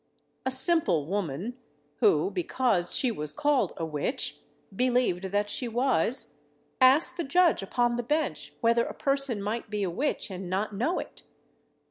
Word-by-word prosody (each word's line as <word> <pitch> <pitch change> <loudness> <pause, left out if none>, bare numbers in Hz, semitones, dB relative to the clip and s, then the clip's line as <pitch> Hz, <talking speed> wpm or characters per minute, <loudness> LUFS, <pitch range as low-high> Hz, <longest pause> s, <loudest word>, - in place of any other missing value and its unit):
A - - +3
simple 260 - +3
woman, 195 - -3 0.4
who, 155 +5 +3
because 190 0 +1
she 255 - +1
was 150 -8 -4
called 285 - +1
a 165 - -2
witch, 160 - -2 0.4
believed 245 -6 +1
that 205 +2 0
she 240 +4 -2
was, 235 - 0 0.4
asked 265 +8 +5
the 340 - -1
judge 350 +4 +3
upon 240 +4 0
the - - 0
bench 245 - -2
whether 235 0 +3
a - - -7
person 275 -6 0
might 225 +2 -3
be 210 -1 -2
a 185 - -1
witch 260 - -2
and 185 -1 -6
not 200 +3 -2
know 250 - 0
it? - - -7
230 Hz, 155 wpm, -27 LUFS, 185-260 Hz, 0.4 s, asked